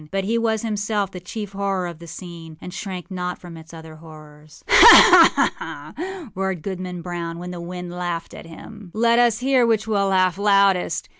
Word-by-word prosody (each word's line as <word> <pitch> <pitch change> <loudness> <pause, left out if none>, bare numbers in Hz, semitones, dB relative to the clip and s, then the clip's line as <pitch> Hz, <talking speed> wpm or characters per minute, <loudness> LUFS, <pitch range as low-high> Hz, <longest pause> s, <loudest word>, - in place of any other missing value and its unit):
But 195 +2 -2
he 230 +4 -1
was 220 -1 -1
himself 210 -2 -2
the 180 - -8
chief 205 +3 -8
horror 195 -2 -3
of 170 -2 -8
the 170 - -12
scene, 165 -2 -11
and 180 - -10
shrank 195 -2 -7
not 180 -1 -4
from 175 -2 -12
its 160 0 -14
other 160 -1 -12
horrors. 155 -1 -16
âHa! - - +5
ha! - - +7 0.4
ha!â 355 - -8
roared 190 -3 -4
Goodman 180 -2 -6
Brown 170 -1 -6
when 180 +1 -8
the 175 -1 -8
wind 180 0 -8
laughed 175 -1 -5
at - - -11
him. 190 +3 -13
âLet 235 +1 +2
us 240 -2 +2
hear 260 -1 +2
which 225 -2 +1
will 205 -3 0
laugh 185 -1 +1
loudest. 200 -2 +1
185 Hz, 195 wpm, -21 LUFS, 170-210 Hz, 0.4 s, ha